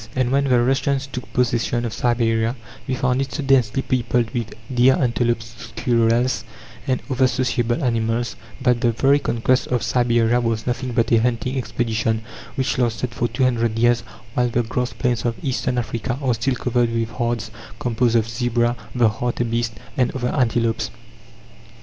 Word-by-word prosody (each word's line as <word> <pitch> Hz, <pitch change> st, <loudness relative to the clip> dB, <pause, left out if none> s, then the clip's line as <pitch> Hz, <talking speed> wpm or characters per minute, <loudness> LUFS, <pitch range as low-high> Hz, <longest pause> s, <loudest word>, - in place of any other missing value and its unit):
And 130 Hz, -1 st, +1 dB
when 140 Hz, +1 st, +2 dB
the 125 Hz, -3 st, +4 dB
Russians 135 Hz, +1 st, +1 dB
took 130 Hz, -2 st, -8 dB
possession 120 Hz, -1 st, +1 dB
of 115 Hz, -, -3 dB
Siberia 115 Hz, -1 st, +1 dB, 0.3 s
they 130 Hz, -, 0 dB
found 125 Hz, +1 st, +1 dB
it 135 Hz, -, -4 dB
so 145 Hz, -, -3 dB
densely 135 Hz, -1 st, +2 dB
peopled 120 Hz, -2 st, 0 dB
with 115 Hz, -3 st, -3 dB, 0.2 s
deer, 125 Hz, +2 st, +5 dB
antelopes, 120 Hz, -2 st, 0 dB, 0.2 s
squirrels, 120 Hz, -1 st, +2 dB, 0.4 s
and 130 Hz, -1 st, 0 dB
other 130 Hz, -1 st, +3 dB
sociable 125 Hz, 0 st, 0 dB
animals, 115 Hz, -1 st, 0 dB, 0.3 s
that 125 Hz, -1 st, +2 dB
the 120 Hz, -2 st, +2 dB
very 140 Hz, +5 st, +3 dB
conquest 130 Hz, -1 st, +1 dB
of 125 Hz, -2 st, 0 dB
Siberia 120 Hz, -1 st, +2 dB
was 115 Hz, -2 st, -1 dB
nothing 125 Hz, 0 st, -2 dB
but 115 Hz, -1 st, +1 dB
a 115 Hz, -1 st, +5 dB
hunting 125 Hz, +2 st, 0 dB
expedition 115 Hz, -2 st, -1 dB, 0.3 s
which 130 Hz, -1 st, 0 dB
lasted 120 Hz, 0 st, 0 dB
for 120 Hz, -, 0 dB
two 130 Hz, -, -1 dB
hundred 115 Hz, -3 st, +1 dB
years; 120 Hz, +1 st, +3 dB, 0.3 s
while 125 Hz, 0 st, +1 dB
the 120 Hz, +1 st, +1 dB
grass 125 Hz, +2 st, -2 dB
plains 120 Hz, -2 st, -1 dB
of 120 Hz, -1 st, 0 dB
Eastern 130 Hz, -2 st, -1 dB
Africa 120 Hz, +1 st, -2 dB
are 130 Hz, -4 st, +1 dB
still 115 Hz, +4 st, 0 dB
covered 120 Hz, -1 st, +1 dB
with 115 Hz, 0 st, -1 dB
herds 115 Hz, -2 st, -2 dB, 0.3 s
composed 120 Hz, -1 st, +1 dB
of 115 Hz, -1 st, +3 dB
zebra, 120 Hz, 0 st, 0 dB, 0.2 s
the 120 Hz, -2 st, +4 dB
hartebeest, 115 Hz, +1 st, -1 dB, 0.2 s
and 125 Hz, -, +3 dB
other 125 Hz, -1 st, -1 dB
antelopes. 115 Hz, -4 st, +1 dB
120 Hz, 165 wpm, -21 LUFS, 115-125 Hz, 0.4 s, deer